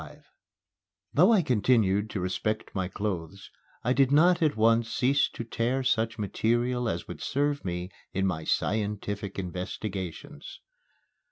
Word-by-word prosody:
XXV - - -12 0.9
Though 180 +9 +6
I 205 -6 +4
continued 110 -5 +2
to 100 - -3
respect 100 +4 -2
my 95 -2 -1
clothes, 95 -2 -5 0.3
I 125 - +2
did 135 0 +3
not 170 +5 +5
at 155 -7 +2
once 115 +1 +3
cease 135 +2 +2
to - - -6
tear 120 +3 -1
such 115 -2 +1
material 120 +3 0
as 85 +1 -4
would - - -8
serve 145 +1 0
me 90 0 -4 0.2
in 95 0 0
my 85 -4 -1
scientific 105 0 -2
investigations. 95 - -6
110 Hz, 140 wpm, -28 LUFS, 95-130 Hz, 0.9 s, Though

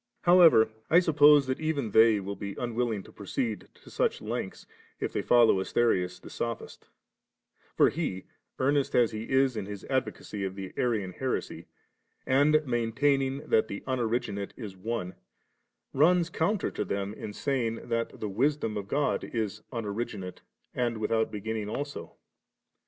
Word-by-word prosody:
33. 175 - +5
However, 110 -11 +7 0.2
I 170 - +7
suppose 150 -4 +5
even 140 -3 -2
they 110 0 +6
will 100 +1 -5
be 100 +1 -6
unwilling 120 -4 -2
to - - -15
proceed 110 +2 -4
to - - -17
such - - 0
lengths, - - -5 0.3
if - - -3
they - - 0
follow 120 -5 +5
Asterius 90 -4 0
the - - -12
sophist 115 -1 -5 0.9
For - - +5
he, 135 - -3 0.3
earnest 140 +1 +1
as 120 -2 +4
he 110 +1 -6
is 130 -1 +3
in 105 -3 -4
his 100 -1 -7
advocacy 105 -5 -2
of 95 0 -3
the 95 -1 -7
Arian 110 -7 0
heresy, 130 +7 -4 0.6
and 150 +3 +3
maintaining 135 +3 0
that 110 - +3
the 100 - -6
Unoriginate 115 -5 -2
is 105 -6 -7
one, 95 -2 -4 0.8
runs 170 +4 +3
counter 190 +6 0
to - - -2
Siem 100 +1 -3
in 105 - -7
saying, 115 -1 -2
that 115 0 -2
the 110 - -3
Wisdom 115 +1 0
of 100 -1 -5
God 145 +6 0
is 110 -2 -3
unoriginate 105 -4 -4 0.3
and 120 -2 -1
without 110 +1 0
beginning 105 0 -4
also. 145 +5 -5
115 Hz, 150 wpm, -28 LUFS, 105-135 Hz, 0.9 s, However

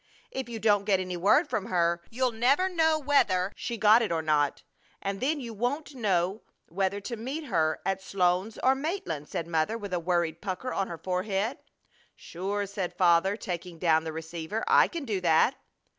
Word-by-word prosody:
If 265 -2 -4
you 230 - -5
don't 205 -2 +3
get 195 -2 +3
any 185 -1 -3
word 200 - +3
from 200 -8 -2
her 170 -1 +1
you'll 250 +2 0
never 260 +11 +2
know 320 -3 +2
whether 205 -11 +2
she 235 - -4
got 215 +2 +6
it 220 - -1
or 165 -1 0
not, 150 -2 +1 0.4
and 195 0 -3
then 290 +4 0
you 235 -4 -6
won't 255 +8 -2
know 195 -4 0 0.3
whether 195 +3 -1
to 235 +4 -5
meet 265 +8 -5
her 160 - 0
at 195 0 -1
Sloan's 185 +2 0
or 260 - +5
Maitland," 280 - -4
said 165 - -3
Mother, 165 +6 0
with 205 -4 -7
a 180 - +1
worried 170 -1 -1
pucker 200 +5 -4
on 195 - -1
her 170 - -6
forehead. 195 +6 -2 0.6
"Sure!" 200 +4 -4
said 195 -2 -5
Father, 180 +2 +4
taking 180 -4 -5
down 160 -2 +3
the 160 - -4
receiver. 160 +5 -5
"I - - +6
can 335 -5 -6
do 205 -6 -2
that." 170 +8 +4
195 Hz, 190 wpm, -28 LUFS, 175-235 Hz, 0.6 s, got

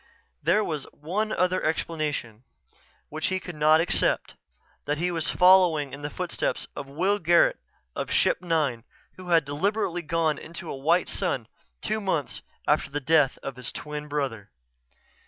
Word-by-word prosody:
There 210 +5 +3
was 155 -7 -3
one 195 +9 -2
other 185 0 +1
explanation, 150 -8 -2 0.7
which 155 +1 -2
he 185 0 0
could 180 -1 -8
not 155 +1 +5
accept: 170 - +1 0.5
that 150 +1 0
he 175 +3 0
was 165 -3 -1
following 180 -6 +5
in 140 - -7
the 145 - -3
footsteps 180 +3 -2
of 140 - -6
Will 185 +9 0
Garret 170 0 +4 0.4
of - - -3
Ship - - +2
Nine 155 -9 0 0.3
who 185 -1 -9
had 165 -3 +4
deliberately 175 +4 -1
gone 165 -2 0
into 165 +1 -8
a - - -4
white 165 +6 +2
sun 150 - -2 0.4
two 215 0 -1
months 165 -8 -2 0.3
after - - +2
the 145 +1 -2
death 150 -1 +3
of 135 -2 -5
his 125 -1 -5
twin 150 0 -6
brother. 135 -8 -3
160 Hz, 155 wpm, -26 LUFS, 145-180 Hz, 0.7 s, not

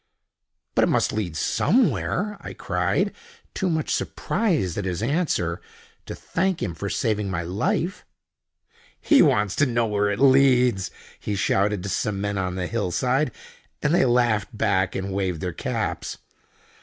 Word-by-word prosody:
"But - - +4
it - - -1
must - - +1
lead 90 -7 -3
somewhere!" 210 - +1
I - - -7
cried, - - 0 0.4
too 190 - -1
much 160 -2 0
surprised 160 - -1
at 100 - -3
his 90 +2 -2
answer 115 - 0 0.5
to - - -5
thank 185 0 -1
him 85 - -2
for 100 +5 -5
saving 105 -1 -1
my 85 -2 -2
life. 90 +5 -1 1.0
"He - - +5
wants 105 -1 +3
to 145 - +4
know 120 -1 +1
where 105 -1 +1
it 105 - -1
leads!" 130 -6 +4 0.3
he 105 - -3
shouted 100 0 +1
to 100 - -4
some 100 +1 -1
men 100 0 -2
on 90 -1 -2
the 90 -1 -2
hill 105 -1 -2
side, 130 - +1 0.5
and 150 +1 +2
they 175 - +4
laughed 120 -3 +1
back, 100 -3 +1
and 95 0 -3
waved 95 -4 -1
their 90 +1 -3
caps. - - -3
105 Hz, 155 wpm, -24 LUFS, 95-130 Hz, 1.0 s, He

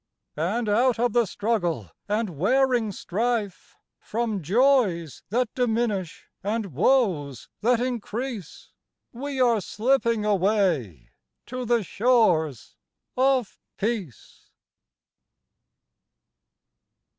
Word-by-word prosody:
And 205 +10 -1
out 235 +4 +3
of 240 -1 +1
the 235 -3 +3
struggle 175 - -2 0.2
and 210 -1 0
wearing 240 - +2
strife, 210 +2 -3 0.2
From 220 -3 -2
joys 190 - +2
that 240 +2 0
diminish, 225 -7 -1 0.2
and 205 -3 -2
woes 160 - +1
that 235 +2 +2
increase, 240 - -5 0.4
We 275 +2 -5
are 235 -4 +3
slipping 230 +1 +1
away 185 - 0 0.3
to 255 0 -5
the 235 -1 +2
shores 180 - +1 0.4
of 260 -4 +1 0.2
Peace. 200 - -5
220 Hz, 85 wpm, -25 LUFS, 185-245 Hz, 0.4 s, out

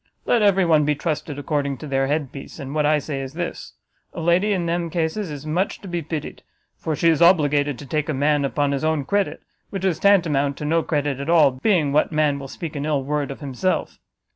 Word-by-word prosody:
Let 235 - +3
every 195 -3 +4
one 155 -3 +4
be 150 0 +1
trusted 150 -1 -3
according 145 -2 -2
to 150 - -9
their 135 -2 0
headpiece 145 -2 -4
and 140 -2 -7
what 150 -1 +2
I 155 0 +4
say 140 -1 -4
is 135 0 -7
this: 175 +1 -5 0.4
a - - -6
lady 175 +5 +2
in 185 -4 0
them 170 0 -1
cases 170 +4 -2
is 145 -1 -7
much 175 +6 -1
to 200 - -9
be 175 -1 -2
pitied, 155 -1 -5 0.3
for 160 - -3
she 165 - +1
is 160 0 +2
obligated 145 -5 +4
to 145 - -9
take 150 +2 -2
a - - +1
man 145 +1 +2
upon 140 +1 0
his 140 +1 -2
own 155 -3 0
credit, 200 +3 -1 0.3
which 195 -1 -4
is 175 -4 +1
tantamount 155 -9 +3
to 150 - -5
no 165 +2 +2
credit 145 -4 -1
at 140 +3 -4
all, 160 -5 +6
being 150 +2 +1
what 150 +3 +2
man 150 -2 +1
will 135 - -7
speak 160 +3 -7
an 140 - -3
ill 145 -3 0
word 145 +1 -2
of 140 - -8
himself? 145 +7 -2
150 Hz, 230 wpm, -22 LUFS, 140-170 Hz, 0.4 s, all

